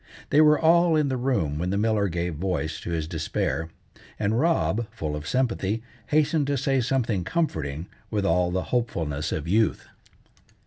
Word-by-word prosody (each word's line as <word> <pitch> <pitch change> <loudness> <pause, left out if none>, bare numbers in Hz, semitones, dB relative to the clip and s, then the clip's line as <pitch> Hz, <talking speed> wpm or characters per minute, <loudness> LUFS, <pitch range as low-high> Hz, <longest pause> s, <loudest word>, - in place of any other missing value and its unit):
They 150 - +6
were 150 -1 +6
all 170 0 +4
in 150 -2 +2
the 130 - 0
room 120 - 0
when 90 +2 -1
the 100 - 0
miller 105 -1 +2
gave 85 -1 -2
voice 80 -1 -2
to - - -7
his 80 -2 -2
despair, 80 0 -2 0.5
and 110 +2 0
Rob, 120 - +1
full 75 -2 -4
of 75 +1 -6
sympathy, 115 -4 0 0.2
hastened 150 -1 +2
to 140 -1 0
say 135 0 +1
something 115 -6 0
comforting, 80 - -2 0.2
with 105 -2 -1
all 90 -2 +2
the 95 +1 -1
hopefulness 80 -12 -1
of 80 +1 -3
youth. 110 +5 +1
105 Hz, 170 wpm, -25 LUFS, 80-135 Hz, 0.5 s, They